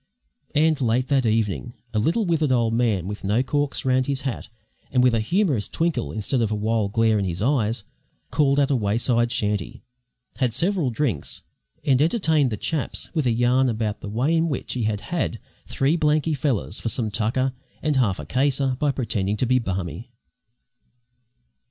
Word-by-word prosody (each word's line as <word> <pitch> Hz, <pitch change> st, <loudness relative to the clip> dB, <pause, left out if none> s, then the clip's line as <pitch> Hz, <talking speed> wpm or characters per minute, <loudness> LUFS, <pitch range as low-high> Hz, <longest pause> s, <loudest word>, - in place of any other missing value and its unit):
And 155 Hz, 0 st, +3 dB
late 125 Hz, +1 st, +1 dB
that 135 Hz, -4 st, +2 dB
evening 110 Hz, +2 st, -1 dB, 0.2 s
a 110 Hz, -, +1 dB
little 170 Hz, -, +1 dB
withered 160 Hz, -5 st, +1 dB
old 115 Hz, -3 st, +2 dB
man 115 Hz, -7 st, +1 dB
with 105 Hz, +1 st, -6 dB
no 105 Hz, +6 st, +2 dB
corks 145 Hz, +1 st, -1 dB
round 130 Hz, 0 st, +2 dB
his 140 Hz, -1 st, -1 dB
hat 135 Hz, -4 st, -4 dB, 0.4 s
and 125 Hz, -1 st, +3 dB
with 125 Hz, -2 st, +4 dB
a 115 Hz, -, +2 dB
humourous 145 Hz, -, +1 dB
twinkle 160 Hz, -7 st, -1 dB
instead 110 Hz, +4 st, -1 dB
of 110 Hz, -, +1 dB
a -, -, +1 dB
wild 105 Hz, -1 st, 0 dB
glare 110 Hz, -2 st, +3 dB
in 100 Hz, -, -1 dB
his 85 Hz, -2 st, -3 dB
eyes, 115 Hz, -3 st, +1 dB, 0.5 s
called 140 Hz, 0 st, +3 dB
at 140 Hz, 0 st, +2 dB
a -, -, +3 dB
wayside 120 Hz, +2 st, +1 dB
shanty, 105 Hz, -3 st, -2 dB, 0.5 s
had 125 Hz, -4 st, 0 dB
several 175 Hz, -5 st, +1 dB
drinks, 115 Hz, -, -2 dB, 0.4 s
and 135 Hz, -2 st, +3 dB
entertained 160 Hz, -, +2 dB
the 105 Hz, -, -3 dB
chaps 150 Hz, +6 st, -2 dB
with 155 Hz, -6 st, 0 dB
a -, -, +3 dB
yarn 125 Hz, +3 st, +3 dB
about 110 Hz, -2 st, -2 dB
the 100 Hz, -, -6 dB
way 130 Hz, +10 st, +1 dB
in 165 Hz, 0 st, +2 dB
which 140 Hz, -, -3 dB
he 120 Hz, -3 st, -1 dB
had 105 Hz, -1 st, -1 dB
"had" 170 Hz, -9 st, -2 dB, 0.3 s
three 140 Hz, +4 st, +1 dB
"blanky 155 Hz, 0 st, +2 dB
fellers" 130 Hz, -8 st, -1 dB
for 115 Hz, -, -2 dB
some 110 Hz, -2 st, -2 dB
tucker 120 Hz, +5 st, 0 dB, 0.3 s
and 150 Hz, -2 st, +1 dB
"half 105 Hz, -8 st, +2 dB
a 75 Hz, -, -6 dB
caser" 135 Hz, -, +1 dB
by 145 Hz, -1 st, +2 dB
pretending 105 Hz, -6 st, -1 dB
to 125 Hz, -, +1 dB
be 130 Hz, +1 st, +3 dB
"barmy." 95 Hz, -, -4 dB
125 Hz, 180 wpm, -23 LUFS, 110-140 Hz, 0.5 s, with